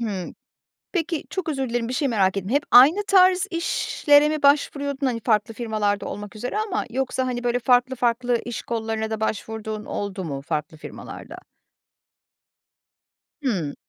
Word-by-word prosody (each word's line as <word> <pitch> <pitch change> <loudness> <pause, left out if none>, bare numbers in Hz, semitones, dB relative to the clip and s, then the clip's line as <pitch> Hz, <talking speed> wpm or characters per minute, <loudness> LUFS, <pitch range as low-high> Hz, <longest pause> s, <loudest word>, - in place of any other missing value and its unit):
Hımm. 200 -6 -4 0.6
Peki 335 -3 -1
çok 370 -4 -3
özür 270 -4 -2
dilerim, 235 -1 -1
bir - - -3
şeyi 275 +1 0
merak 195 -3 +2
ettim, 195 +1 -4
hep 285 +3 +2
aynı 305 +12 +7
tarz 370 0 +5
işlere 300 -3 +2
mi 305 -1 -3
başvuruyordun, 280 -1 +2
hani, 235 -2 -1
farklı 215 -1 +1
firmalarda 215 -3 -1
olmak 205 +1 -7
üzere 245 - -4
ama 420 -1 -1
yoksa, 260 +1 -1
hani, 245 -1 -3
böyle, 245 0 +1
farklı 250 +2 +3
farklı 240 0 0
iş 240 - -4
kollarına 220 -1 -3
da 220 -1 -3
başvurduğun 220 0 -4
oldu 200 -2 -4
mu 140 -4 -5
farklı 150 +2 -4
firmalarda? - - -10 2.1
Hımm. 180 - -1
240 Hz, 150 wpm, -23 LUFS, 215-280 Hz, 2.1 s, aynı